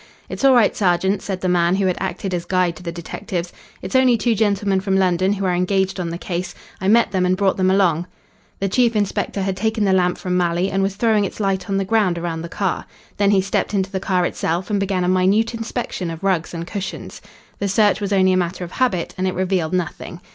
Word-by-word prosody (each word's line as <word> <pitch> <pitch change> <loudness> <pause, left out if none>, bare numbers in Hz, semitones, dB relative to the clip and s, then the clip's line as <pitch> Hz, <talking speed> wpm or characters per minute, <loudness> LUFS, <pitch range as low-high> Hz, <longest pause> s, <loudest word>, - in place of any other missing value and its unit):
"It's - - -6
all 270 -1 +6
right, 230 -4 +4
sergeant," 190 +1 +1
said 190 -3 -4
the 185 - -1
man 175 0 +2
who 195 0 0
had 185 -1 +1
acted 190 0 -3
as 175 -1 -2
guide 180 -2 +1
to - - -12
the 170 -1 -5
detectives. 175 +1 -5 0.3
"It's 185 +5 -5
only 255 -2 +5
two 235 +1 +1
gentlemen 200 -2 +1
from 190 -1 0
London 185 +1 +2
who 200 -1 -3
are 180 - +1
engaged 190 +2 0
on 175 -2 -2
the 170 - -4
case. 175 0 -4 0.3
I 190 - -1
met 230 +1 +4
them 190 -2 +1
and 185 0 +2
brought 195 -1 +2
them 185 -1 +2
along." 180 -3 +2 0.5
The 195 - 0
chief 235 +3 +2
inspector 200 -1 -1
had 190 0 -1
taken 220 +2 0
the 190 - +3
lamp 180 -1 +2
from 180 -1 -2
Malley 175 +1 +1
and 195 - 0
was 195 0 -1
throwing 215 -1 +2
its 195 - -5
light 195 -2 -1
on 195 - +1
the 195 - 0
ground 195 -4 +2
around 165 -1 -3
the 170 - -7
car. 195 0 -2 0.3
Then 200 -1 +3
he 200 -2 +4
stepped 195 +2 -1
into 190 -1 0
the 190 - -2
car 185 -2 +1
itself 175 +4 -2
and 205 - +1
began 195 -2 0
a - - 0
minute 190 +5 +2
inspection 225 -5 -4
of 165 +2 -7
rugs 185 -4 0
and 170 -1 -5
cushions. 195 +1 -6 0.4
The 200 - -1
search 205 +1 +2
was 200 -1 -2
only 190 -1 +4
a - - +2
matter 180 0 -2
of 175 - -7
habit, 195 -10 0
and 190 - +1
it 185 - -2
revealed 185 -3 0
nothing. 175 -1 -3
190 Hz, 240 wpm, -20 LUFS, 180-200 Hz, 0.5 s, all